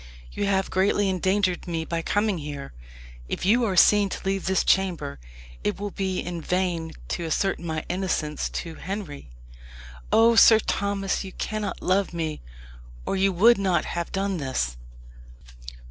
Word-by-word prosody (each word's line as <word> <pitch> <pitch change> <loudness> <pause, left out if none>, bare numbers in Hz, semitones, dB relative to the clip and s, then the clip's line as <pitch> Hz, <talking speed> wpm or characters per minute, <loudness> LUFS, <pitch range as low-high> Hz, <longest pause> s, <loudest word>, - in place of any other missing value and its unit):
You 205 - -2
have 195 -1 0
greatly 195 +1 +2
endangered 185 0 0
me 165 -2 -2
by 165 0 -2
coming 205 +1 0
here. 145 - -7 0.6
If - - -3
you 235 +5 +4
are 195 -4 -1
seen 205 +2 +6
to - - -6
leave 195 0 -1
this 190 -1 +2
chamber, 175 - 0 0.4
it 105 - -1
will 205 0 -4
be 190 -1 -2
in 175 -1 -4
vain 175 -2 -1 0.2
to 175 - -2
assert 195 +5 0
my 160 -2 -4
innocence 180 -5 -2
to 165 -2 -5
Henry. 165 - -6 0.8
Oh, 230 +1 +6
Sir 225 0 +8
Thomas! 200 -2 -1
you 190 - -9
cannot 215 -2 -4
love 185 -1 +1
me, 160 -2 -3 0.6
or - - -1
you 195 0 +2
would 215 +5 +5
not 185 -4 +1
have 170 -1 -4
done 195 -1 -1
this." 100 - -2
190 Hz, 155 wpm, -25 LUFS, 165-200 Hz, 0.8 s, Sir